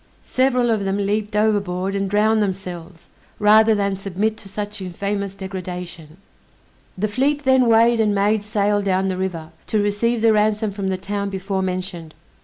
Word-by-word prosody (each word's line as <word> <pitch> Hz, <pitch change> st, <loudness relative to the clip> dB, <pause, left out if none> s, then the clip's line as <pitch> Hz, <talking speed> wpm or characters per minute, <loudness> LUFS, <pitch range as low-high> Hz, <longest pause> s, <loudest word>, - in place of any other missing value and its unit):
Several 255 Hz, -2 st, +1 dB
of 215 Hz, -3 st, 0 dB
them 195 Hz, 0 st, -1 dB
leaped 210 Hz, +1 st, -1 dB
overboard 200 Hz, -3 st, 0 dB
and 195 Hz, -1 st, -1 dB
drowned 215 Hz, +2 st, +3 dB
themselves, 185 Hz, -3 st, -5 dB, 0.3 s
rather 215 Hz, +1 st, +5 dB
than 200 Hz, -1 st, 0 dB
submit 195 Hz, +3 st, -2 dB
to 195 Hz, -, -12 dB
such 205 Hz, +1 st, -5 dB
infamous 200 Hz, +2 st, -3 dB
degradation. 180 Hz, -4 st, -7 dB, 0.8 s
The 210 Hz, +3 st, 0 dB
fleet 280 Hz, +7 st, 0 dB
then 260 Hz, -2 st, +4 dB
weighed 230 Hz, +1 st, +4 dB
and 210 Hz, -2 st, +2 dB
made 205 Hz, +2 st, +2 dB
sail 205 Hz, -1 st, 0 dB
down 190 Hz, -1 st, 0 dB
the 185 Hz, -, -1 dB
river, 170 Hz, -4 st, -4 dB, 0.2 s
to 215 Hz, -, +1 dB
receive 220 Hz, +3 st, 0 dB
the 225 Hz, -1 st, +5 dB
ransom 215 Hz, 0 st, +1 dB
from 200 Hz, -1 st, -4 dB
the 190 Hz, -1 st, -1 dB
town 200 Hz, +1 st, -3 dB
before 195 Hz, 0 st, -3 dB
mentioned. 180 Hz, -4 st, -4 dB
200 Hz, 165 wpm, -21 LUFS, 190-215 Hz, 0.8 s, rather